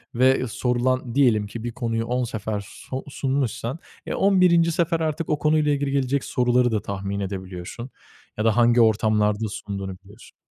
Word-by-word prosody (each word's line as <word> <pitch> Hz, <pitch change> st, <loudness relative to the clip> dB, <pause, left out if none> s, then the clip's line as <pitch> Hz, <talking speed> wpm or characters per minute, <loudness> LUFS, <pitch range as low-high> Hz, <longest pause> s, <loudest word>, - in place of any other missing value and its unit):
ve 130 Hz, 0 st, +3 dB
sorulan 125 Hz, +1 st, -1 dB
diyelim 115 Hz, -7 st, +3 dB
ki 115 Hz, +2 st, -7 dB
bir 120 Hz, -, -3 dB
konuyu 115 Hz, -2 st, -2 dB
10 125 Hz, +2 st, -1 dB
sefer 110 Hz, -3 st, -4 dB, 0.2 s
so 130 Hz, 0 st, -4 dB
sunmuşsan, 135 Hz, 0 st, -2 dB, 0.3 s
e -, -, -3 dB
11. 180 Hz, -4 st, +4 dB
sefer 170 Hz, -1 st, 0 dB
artık 160 Hz, 0 st, -2 dB
o 150 Hz, -, +1 dB
konuyla 150 Hz, 0 st, +2 dB
ilgili 140 Hz, -1 st, 0 dB
gelecek 140 Hz, 0 st, 0 dB
soruları 125 Hz, 0 st, +2 dB
da 110 Hz, -2 st, 0 dB
tahmin 100 Hz, 0 st, -4 dB
edebiliyorsun 95 Hz, +4 st, -6 dB, 0.5 s
ya 105 Hz, -, -1 dB
da 110 Hz, 0 st, +3 dB
hangi 120 Hz, 0 st, +5 dB
ortamlarda 110 Hz, -1 st, +2 dB
sunduğunu 100 Hz, -2 st, -6 dB
biliyorsun. 100 Hz, +2 st, -17 dB
120 Hz, 160 wpm, -23 LUFS, 105-140 Hz, 0.5 s, hangi